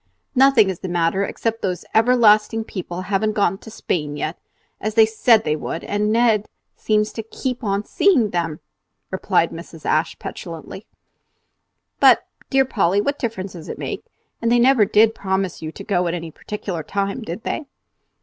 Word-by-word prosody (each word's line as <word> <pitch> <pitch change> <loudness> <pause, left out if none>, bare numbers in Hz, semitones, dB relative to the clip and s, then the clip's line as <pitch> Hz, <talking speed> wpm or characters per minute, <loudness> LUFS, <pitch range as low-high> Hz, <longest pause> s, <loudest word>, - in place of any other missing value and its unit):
"Nothing 260 -7 +5
is 180 - -8
the 190 - -5
matter 175 +3 +1
except 225 +2 -3
that - - 0
those 180 -1 -4
everlasting 225 -2 +4
people 185 -4 -6
haven't 205 +3 0
gone 195 -2 +1
to - - -12
Spain 150 -9 -3
yet, 155 +3 -3 0.4
as 215 +1 -3
they 225 -1 +7
said 220 0 +3
they 150 - 0
would, 155 +2 -5
and 210 +1 0
Ned 225 -2 +3 0.3
seems 210 0 0
to 225 - -4
keep 250 +3 -5
on 200 0 -1
seeing 265 - +3
them," 165 -3 -2 0.5
replied - - +1
Mrs. - - -10
Ashe, - - +1
petulantly. - - -8 1.1
"But, - - +6 0.2
dear 270 -1 +3
Polly, 200 -6 +1
what 285 +7 -1
difference 200 -6 -4
does 165 -3 -10
it - - -5
make? - - -5 0.4
And 230 0 +1
they 240 - +5
never 240 -2 +5
did 220 +2 +4
promise 190 -3 -2
you 155 0 -5
to - - -10
go 180 -3 0
on 170 - -1
any 165 -2 -6
particular 190 -2 -5
time, 200 +7 -2
did 215 0 -6
they?" 305 - -3
210 Hz, 175 wpm, -21 LUFS, 180-225 Hz, 1.1 s, they